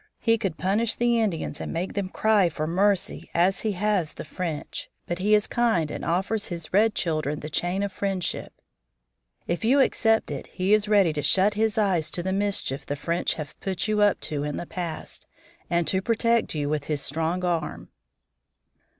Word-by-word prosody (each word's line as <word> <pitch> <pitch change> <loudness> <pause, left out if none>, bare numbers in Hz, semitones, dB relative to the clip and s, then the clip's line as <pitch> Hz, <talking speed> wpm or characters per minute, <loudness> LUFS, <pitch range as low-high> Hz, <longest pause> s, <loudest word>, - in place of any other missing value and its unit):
He 230 0 +2
could 190 -7 -2
punish 215 +5 +1
the 240 -1 +2
Indians 175 -9 -1
and - - -4
make 175 +3 -3
them 200 -2 -2
cry 210 -3 +3
for 155 -1 -3
mercy, 190 +4 0
as 180 +3 +3
he 215 -2 0
has 190 -4 0
the - - -7
French. 160 -1 -5 0.2
But 175 +1 -3
he 210 +3 +4
is 210 - +2
kind 220 -11 +1
and - - -5
offers 195 +5 0
to 175 - -4
his 170 0 -9
red 210 +2 +4
children 155 -3 -1
the 150 - -6
chain 175 +6 0
of 200 - -2
friendship. 195 -3 -2 0.9
If 175 +5 -2
you 260 +5 +4
accept 225 - +3
it 140 - -5
he 185 +2 0
is 215 -1 +3
ready 200 -6 +4
to 150 - -2
shut 190 +8 +3
his 220 0 0
eyes 185 -7 +2
to 175 - -3
the 190 +1 -1
mischief 195 -9 -1
the 145 - -3
French 170 +4 -1
have 150 -3 -6
put 190 0 -2
you 215 -1 +1
up 205 -1 +4
to 145 -2 -3
in 150 0 -3
the - - -4
past, 170 -3 -6 0.4
and 170 0 +2
to 190 - +1
protect 230 -1 +1
you 145 -1 -1
with 150 -1 -1
his 150 -2 -2
strong 165 +5 -1
arm." 165 -4 -2
185 Hz, 195 wpm, -26 LUFS, 160-210 Hz, 0.9 s, he